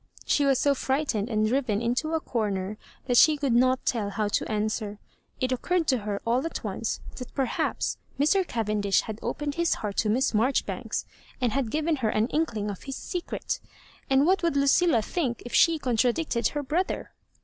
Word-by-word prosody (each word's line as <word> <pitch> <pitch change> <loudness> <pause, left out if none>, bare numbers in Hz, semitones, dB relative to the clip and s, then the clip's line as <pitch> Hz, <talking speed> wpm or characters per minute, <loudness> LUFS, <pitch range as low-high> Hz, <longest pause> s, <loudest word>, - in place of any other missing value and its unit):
She 290 - +2
was 270 -2 +4
so 285 +2 +3
frightened 265 -5 -1
and 215 -2 +1
driven 235 -4 +1
into 245 +7 -1
a - - +1
comer 210 -6 -2 0.3
that 245 -2 +2
she 310 +3 +7
could 280 -4 0
not 255 +2 +3
tell 215 -5 0
how 205 +1 -1
to 205 - -1
an 210 0 +1
swer. 215 -1 -3 0.4
It 255 0 0
occurred 335 +7 0
to 260 -3 +3
her 205 -1 -3
all 240 +3 +2
at 330 - -4
once - - -3 0.2
that 250 - -8
per 270 - +2
haps - - -1 0.2
Mr. 310 +7 +4
Cavendish 210 -3 +1
had 220 -1 -7
opened 295 -1 -3
his 340 - +2
heart 205 -2 -5
to 215 - +2
Miss 245 +4 +2
Marjoribanks, 235 +6 0 0.3
and 245 -3 +1
had 265 -2 -1
given 310 +4 0
her 230 -5 0
an 215 +3 +1
inkling 225 -10 -1
of 195 - -9
his 270 -1 -6
secret; 355 +4 -4 0.5
and 270 +1 +4
what 375 +3 +4
woiUd 335 -4 0
LucUla 280 -3 +3
think 265 -10 -2
if 245 - -8
she 330 -1 +5
contradicted 245 -1 +1
her 295 0 -3
brother? 330 +7 -2
250 Hz, 195 wpm, -27 LUFS, 215-290 Hz, 0.5 s, she